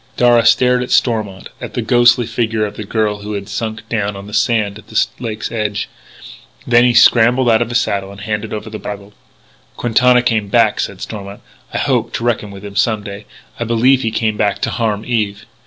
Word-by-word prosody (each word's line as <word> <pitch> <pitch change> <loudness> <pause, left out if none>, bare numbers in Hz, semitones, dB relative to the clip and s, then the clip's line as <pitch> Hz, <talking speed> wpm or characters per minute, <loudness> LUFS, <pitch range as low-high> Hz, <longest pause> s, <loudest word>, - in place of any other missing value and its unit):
Darragh 120 -1 +4
stared 125 +1 +4
at 125 - -4
Stormont, 110 -6 0
at - - -7
the - - -1
ghostly 120 0 +4
figure 110 -1 -1
of 105 0 -7
the 110 - -6
girl 105 0 -1
who 105 +1 -6
had 100 -1 -5
sunk 110 +2 -5
down 105 -3 -2
on 100 0 -9
the 105 - -11
sand 105 -3 0
at - - -18
the 110 - +2
lake's 110 -3 -5
edge. 105 -2 -2 0.8
Then 120 0 +4
he 120 -1 +2
scrambled 120 +3 +5
out 115 -1 +4
of 120 - -1
the 120 - -5
saddle 100 -4 0
and 100 - -12
handed 105 +1 -3
over 105 0 -5
the 110 - -6
bridle. 100 0 -8 0.6
"Quintana 125 +1 +3
came 110 -4 0
back," 110 +1 +2
said 100 - -4
Stormont. 100 -2 -7 0.3
"I - - -3
hope - - 0
to - - -3
reckon 115 -3 -1
with 100 0 -10
him 100 -1 -9
some 105 +1 +1
day.... 100 +1 -9 0.3
I - - 0
believe 120 +3 +3
he 115 - 0
came 110 -1 -1
back 100 -2 +1
to - - 0
harm 110 -2 -2
Eve.... 105 -3 -2
110 Hz, 210 wpm, -16 LUFS, 105-120 Hz, 0.8 s, scrambled